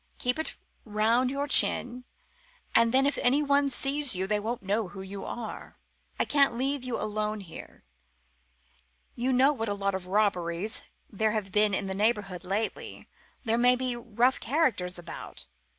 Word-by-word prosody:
Keep 250 +5 -1
it 315 - -1
up - - -11 0.3
round 225 +4 +2
your 280 +2 -2
chin, 250 -3 +3 0.7
and 230 0 +5
then 265 +2 +4
if 285 - 0
anyone 280 +2 +3
sees 275 -1 +1
you 185 +1 -1
they 210 +1 +1
won't 225 +1 -4
know 205 +2 0
who 190 +1 -9
you 195 +1 -7
are. 235 -2 -7 0.4
I - - +3
can't 275 -5 +3
leave 270 +1 0
you 250 -2 -3
alone 215 0 -2
here. 170 -4 -12 1.3
You 250 +2 -1
know 265 +3 +4
what 225 -5 -3
a 205 - -1
lot 200 0 -1
of 190 -1 -4
robberies 190 -1 -1 0.2
there 215 0 0
have 205 -3 -3
been 210 0 +3
in 195 - -2
the 190 - -3
neighbourhood 205 -3 0
lately; 205 +4 -3 0.4
there 225 +1 +1
may 250 +1 +5
be 250 -1 -2
rough 240 +2 +1
characters 230 - 0
about. 175 - -7
225 Hz, 165 wpm, -28 LUFS, 200-255 Hz, 1.3 s, and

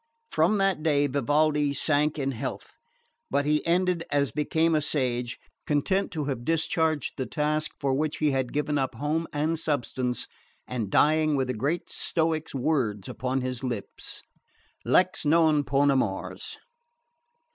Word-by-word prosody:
From 215 - +3
that 195 -4 +1
day 145 -2 +3
Vivaldi 145 +2 +2
sank 150 +2 +1
in 135 -2 -1
health; 120 - -6 0.5
but 140 +1 +1
he 150 0 +2
ended 180 0 +2
as 140 -4 +1
became 160 +4 +1
a 155 - +3
sage, 125 -5 0 0.3
content 185 +7 +1
to 155 -3 -2
have 130 -4 -3
discharged 160 0 0
the 130 - -2
task 155 0 0
for 135 -2 0
which 150 +3 -1
he 150 -2 +2
had 130 -2 -1
given 150 0 0
up 130 -2 -2
home 155 +6 -1
and 155 +2 0
substance, 130 -5 -1 0.4
and 115 -5 -3
dying 155 +5 +3
with 130 -2 0
the - - 0
great 145 +10 -1
Stoic's 160 -3 0
words 125 -8 0
upon 130 +1 -2
his 125 0 -4
lips: 120 -6 -5 0.6
Lex - - +2
non 155 -1 +4
poena 140 0 +3
mors. 100 -7 -2
145 Hz, 145 wpm, -27 LUFS, 130-155 Hz, 0.6 s, non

